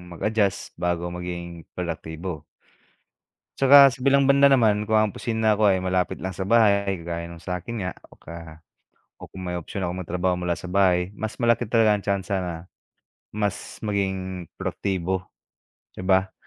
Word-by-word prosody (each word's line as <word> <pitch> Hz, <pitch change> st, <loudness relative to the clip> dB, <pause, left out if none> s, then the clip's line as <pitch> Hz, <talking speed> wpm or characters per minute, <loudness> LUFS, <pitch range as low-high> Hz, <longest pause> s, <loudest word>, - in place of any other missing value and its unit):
mag-adjust 105 Hz, -2 st, -1 dB
bago 85 Hz, 0 st, -1 dB
maging 85 Hz, -1 st, -7 dB
produktibo. 80 Hz, -1 st, -5 dB, 1.1 s
Tsaka 140 Hz, +1 st, +8 dB
sa 130 Hz, -, -12 dB
bilang 140 Hz, 0 st, +4 dB
banda 140 Hz, 0 st, +6 dB
naman 110 Hz, -6 st, +4 dB
kung 110 Hz, 0 st, +2 dB
ang 110 Hz, -, +3 dB
opisina 110 Hz, -2 st, +1 dB
ko 105 Hz, -1 st, +4 dB
ay 95 Hz, -, +2 dB
malapit 90 Hz, 0 st, -1 dB
lang 95 Hz, 0 st, -5 dB
sa 95 Hz, -, -4 dB
bahay 100 Hz, -2 st, +3 dB
kagaya 85 Hz, 0 st, -5 dB
ng 85 Hz, -, -10 dB
sakin 90 Hz, +4 st, -4 dB
nga 95 Hz, -, -3 dB, 0.2 s
o -, -, -19 dB
ka 80 Hz, -1 st, -10 dB, 0.6 s
o -, -, -10 dB
kung 95 Hz, -1 st, -8 dB
may 90 Hz, -, -3 dB
opsiyon 90 Hz, +2 st, -4 dB
akong 90 Hz, +1 st, -3 dB
magtrabaho 90 Hz, +1 st, -1 dB
mula 90 Hz, -1 st, -2 dB
sa -, -, -9 dB
bahay 90 Hz, 0 st, +2 dB
mas 110 Hz, +1 st, -5 dB
malapit 120 Hz, -2 st, +1 dB
talaga 115 Hz, -2 st, +4 dB
ang 105 Hz, -, -1 dB
tsansa 100 Hz, -1 st, -1 dB
na 90 Hz, -2 st, -4 dB, 0.8 s
mas 105 Hz, 0 st, -3 dB
maging 95 Hz, -4 st, -2 dB
produktibo, 95 Hz, -1 st, -2 dB, 0.7 s
di -, -, -10 dB
ba? 95 Hz, 0 st, +2 dB
95 Hz, 160 wpm, -24 LUFS, 90-105 Hz, 1.1 s, Tsaka